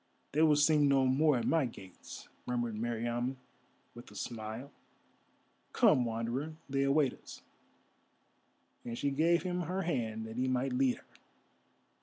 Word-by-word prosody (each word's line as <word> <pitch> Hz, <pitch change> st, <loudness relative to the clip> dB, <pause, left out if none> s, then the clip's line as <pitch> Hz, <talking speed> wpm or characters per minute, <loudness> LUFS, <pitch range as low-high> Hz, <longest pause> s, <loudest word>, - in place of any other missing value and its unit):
"They 150 Hz, -, +1 dB
will 155 Hz, -2 st, +6 dB
sing 150 Hz, 0 st, +4 dB
no 135 Hz, -1 st, +4 dB
more 140 Hz, +2 st, +3 dB
at 120 Hz, -, -2 dB
my 160 Hz, -5 st, +2 dB
gates," 95 Hz, -5 st, -11 dB, 0.2 s
murmured 120 Hz, -2 st, -1 dB
Meriamun, 120 Hz, +3 st, -2 dB, 0.6 s
with 120 Hz, -, -12 dB
a 105 Hz, -, -15 dB
smile. 110 Hz, +5 st, -6 dB, 1.0 s
"Come, 125 Hz, -, +4 dB
Wanderer; 120 Hz, +7 st, -3 dB
they 135 Hz, 0 st, 0 dB
await 140 Hz, -1 st, +3 dB
us," -, -, -13 dB, 1.4 s
and 115 Hz, 0 st, -5 dB
she 140 Hz, -, 0 dB
gave 165 Hz, +5 st, +2 dB
him 180 Hz, -1 st, -2 dB
her 185 Hz, +3 st, -2 dB
hand 110 Hz, -9 st, -2 dB
that 110 Hz, +1 st, -8 dB
he 130 Hz, +1 st, +1 dB
might 130 Hz, 0 st, 0 dB
lead 125 Hz, -1 st, +2 dB
her. -, -, -18 dB
130 Hz, 145 wpm, -32 LUFS, 120-150 Hz, 1.4 s, will